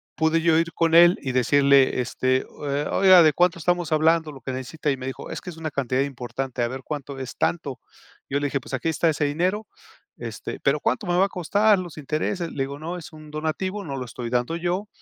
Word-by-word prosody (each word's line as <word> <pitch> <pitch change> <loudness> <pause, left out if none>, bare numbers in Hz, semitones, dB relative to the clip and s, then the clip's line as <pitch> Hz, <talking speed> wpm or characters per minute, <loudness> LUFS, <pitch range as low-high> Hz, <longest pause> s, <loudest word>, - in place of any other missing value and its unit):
pude 160 +1 +2
yo 165 -1 +4
ir 165 0 0
con 165 -1 +2
él 175 +1 +7
y 130 - -3
decirle 135 +1 +4
este: 130 +1 -2 0.4
"Eh, 140 +1 -1
oiga, 185 -3 +8
¿de 155 -1 +5
cuánto 175 -1 +2
estamos 175 0 0
hablando, 160 0 +3
lo 135 - -12
que 130 +2 -5
necesita?". 140 +4 -3
Y 135 - -2
me 130 0 -6
dijo: 135 - -7
"Es - - -5
que - - -8
es 165 - -13
una 160 -1 -4
cantidad 130 -2 0
importante". 130 -1 -5
"A - - +1
ver, 130 +1 -6
¿cuánto 140 -1 -6
es?", 130 -2 -6
"tanto". 140 -7 -1 0.5
Yo 140 - 0
le 145 - -1
dije: 140 0 -1
"Pues - - -11
aquí 130 +5 -1
está 160 +1 +1
ese 150 -1 0
dinero, 180 +9 -1 0.5
este", - - -6
"...pero - - +2
¿cuánto 220 - 0
me 175 0 +1
va 190 - +5
a - - -4
costar, 205 +4 +3
los 175 -4 -8
intereses?". 155 +4 -2
Le 135 - -2
digo: 140 +1 -6
"No, 170 +3 -5
es 175 - -10
un 155 -1 -12
donativo, 185 +6 -3
no 140 -3 -5
lo 130 - -4
estoy 120 0 -6
dando 125 +6 0
y, 170 - -6
yo 185 +4 -1
155 Hz, 240 wpm, -24 LUFS, 135-170 Hz, 0.5 s, oiga